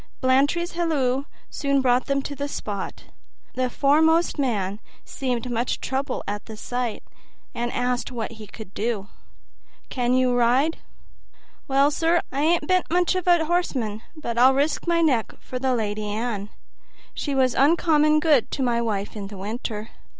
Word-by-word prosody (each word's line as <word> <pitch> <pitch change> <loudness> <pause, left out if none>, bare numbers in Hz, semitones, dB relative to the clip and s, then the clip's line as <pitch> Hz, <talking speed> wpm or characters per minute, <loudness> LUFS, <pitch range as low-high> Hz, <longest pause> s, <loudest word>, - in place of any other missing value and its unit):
Blantyre's 285 +7 +2
halloo 280 -6 0 0.3
soon 280 -2 +1
brought 250 -1 +2
them 275 -1 0
to 285 - -5
the 285 +1 -3
spot. 205 -8 -5 0.5
The 255 0 0
foremost 320 +5 +3
man 205 -7 -1 0.3
seemed 250 -3 -3
much 240 +1 -1
troubled 265 0 -2
at 205 +1 -4
the 220 -1 -8
sight, 245 0 -3 0.5
and 240 0 -2
asked 250 +1 -1
what 230 -3 -4
he 220 -2 -10
could 210 -1 -11
do. 210 -3 -2 0.8
"Can 250 -1 +1
you 255 -1 +3
ride?" 250 +7 +2 0.9
"Well, 275 +1 +4
sir, 330 +3 +2
I 310 +5 +2
bean't 370 -1 +2
much 355 +1 +2
of 370 -1 -3
a 345 -2 +5
horseman, 265 -11 -1
but 235 -7 -3
I'd 260 +2 +6
risk 290 +5 0
my 335 -1 +3
neck 255 -8 +1
for 255 - -6
the 260 -1 +1
Lady 210 -2 -2
Anne; 210 -1 -3 0.6
she 285 -2 -3
was 260 -2 +3
uncommon 305 0 +4
good 300 -6 +3
to 270 - -2
my 235 -2 +1
wife 210 -3 -2
in 200 -2 -5
the 200 0 -9
winter." 215 +2 -5
255 Hz, 155 wpm, -24 LUFS, 230-300 Hz, 0.9 s, I'd